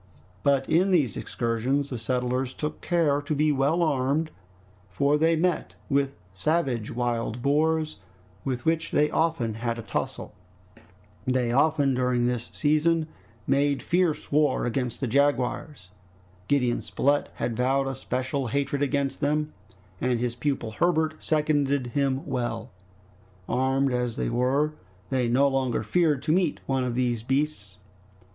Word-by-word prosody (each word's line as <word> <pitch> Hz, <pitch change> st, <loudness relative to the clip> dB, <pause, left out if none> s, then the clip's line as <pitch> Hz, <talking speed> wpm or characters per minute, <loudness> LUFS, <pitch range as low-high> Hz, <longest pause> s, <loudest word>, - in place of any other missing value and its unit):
But 140 Hz, -1 st, +2 dB
in 180 Hz, +4 st, +3 dB
these 150 Hz, -, +2 dB
excursions 125 Hz, +5 st, -1 dB
the 125 Hz, -, -2 dB
settlers 125 Hz, +2 st, -1 dB
took 150 Hz, 0 st, -4 dB
care 155 Hz, -5 st, +2 dB
to 145 Hz, +1 st, -2 dB
be 150 Hz, +1 st, +3 dB
well 145 Hz, +5 st, +2 dB
armed, 150 Hz, +1 st, +1 dB, 0.6 s
for 140 Hz, +11 st, +2 dB
they 165 Hz, +2 st, +3 dB
met 175 Hz, +1 st, 0 dB, 0.2 s
with 140 Hz, 0 st, +1 dB, 0.2 s
savage 120 Hz, -, 0 dB
wild 120 Hz, -1 st, -2 dB
boars, 155 Hz, +1 st, +1 dB, 0.5 s
with 125 Hz, -3 st, -3 dB
which 165 Hz, 0 st, +1 dB
they 150 Hz, +1 st, +2 dB
often 160 Hz, -9 st, 0 dB
had 115 Hz, +1 st, -3 dB
a 115 Hz, -, -6 dB
tussle. 100 Hz, -, -4 dB, 0.9 s
They 125 Hz, -2 st, +1 dB
also, 145 Hz, +3 st, +3 dB
during 125 Hz, -2 st, +1 dB
this 120 Hz, -1 st, -2 dB
season, 155 Hz, +2 st, +2 dB, 0.4 s
made 140 Hz, 0 st, +1 dB
fierce 175 Hz, -3 st, 0 dB
war 150 Hz, -2 st, +2 dB
against 120 Hz, 0 st, -2 dB
the 130 Hz, -, 0 dB
jaguars. 135 Hz, -, 0 dB, 0.6 s
Gideon 125 Hz, -4 st, +1 dB
Spilett 145 Hz, +2 st, 0 dB
had 115 Hz, -, -2 dB
vowed 135 Hz, +3 st, +1 dB
a 135 Hz, -, -2 dB
special 130 Hz, +1 st, -2 dB
hatred 140 Hz, +3 st, -1 dB
against 140 Hz, -1 st, 0 dB
them, 150 Hz, +1 st, 0 dB, 0.5 s
and 125 Hz, -2 st, +1 dB
his 120 Hz, 0 st, -1 dB
pupil 125 Hz, -3 st, -2 dB
Herbert 160 Hz, +4 st, +1 dB
seconded 145 Hz, -3 st, +1 dB
him 140 Hz, +1 st, 0 dB
well. 120 Hz, -1 st, -3 dB, 0.8 s
Armed 135 Hz, +1 st, +1 dB
as 125 Hz, -2 st, -1 dB
they -, -, -1 dB
were, 130 Hz, +5 st, +1 dB, 0.4 s
they 130 Hz, -2 st, +1 dB
no 130 Hz, +4 st, +4 dB
longer 130 Hz, -4 st, 0 dB
feared 150 Hz, +3 st, +1 dB
to -, -, 0 dB
meet 175 Hz, -2 st, +2 dB
one 135 Hz, -1 st, 0 dB
of 125 Hz, -2 st, -2 dB
those 120 Hz, -3 st, 0 dB
beasts. 135 Hz, -6 st, -2 dB
135 Hz, 140 wpm, -26 LUFS, 125-150 Hz, 0.9 s, no